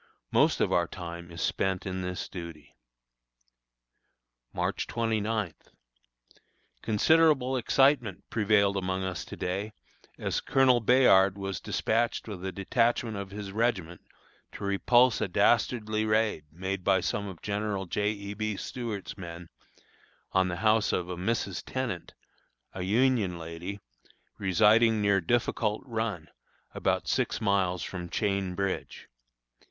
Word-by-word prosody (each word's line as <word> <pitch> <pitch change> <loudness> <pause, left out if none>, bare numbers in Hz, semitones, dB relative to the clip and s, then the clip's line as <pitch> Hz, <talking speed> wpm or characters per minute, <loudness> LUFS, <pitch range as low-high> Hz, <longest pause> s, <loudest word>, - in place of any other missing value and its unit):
Most - - +3
of - - +2
our 85 -1 +2
time 85 -1 -8
is 85 0 -5
spent 95 -1 -1
in 95 -1 -3
this 90 -1 -4
duty. 85 -5 -9 1.8
March - - -2
29. 110 -4 -1 1.3
Considerable 135 +3 +3
excitement 125 -4 +2
prevailed 100 -2 +3
among 95 0 -2
us 95 -4 -3
to - - -9
day, 100 +4 -3 0.4
as - - -2
Colonel 130 -2 +4
Bayard 100 -5 +5
was 95 -2 -4
dispatched 115 +1 0
with 95 -4 -7
a 95 - -3
detachment 115 +4 0
of 100 -1 -5
his 100 0 -7
regiment 95 -6 -1 0.5
to - - -8
repulse 120 +5 +3
a - - +1
dastardly 110 +2 +2
raid 110 -7 +1
made 95 +3 -4
by 95 0 +3
some 100 +3 -2
of 95 -4 -10
General 100 -1 -2
J. 105 +4 0
E. 100 -1 -5
B. 110 -1 -3
Stuart's 105 -5 -5
men, 85 -1 -8 0.8
on 95 -1 +3
the 90 - -2
house 110 0 +4
of 90 0 -1
a 90 - -3
Mrs. 95 0 -2
Tenant, 125 -9 -4 0.6
a 95 - -5
Union 105 -2 +2
lady, 85 +4 -6 0.6
residing 110 +3 +4
near 100 -2 +3
Difficult 110 +2 0
Run, 110 - -3 0.5
about - - 0
six - - 0
miles 95 -4 +1
from 90 -2 -6
Chain 100 -1 -1
Bridge. 100 0 -3
100 Hz, 130 wpm, -28 LUFS, 90-110 Hz, 1.8 s, Bayard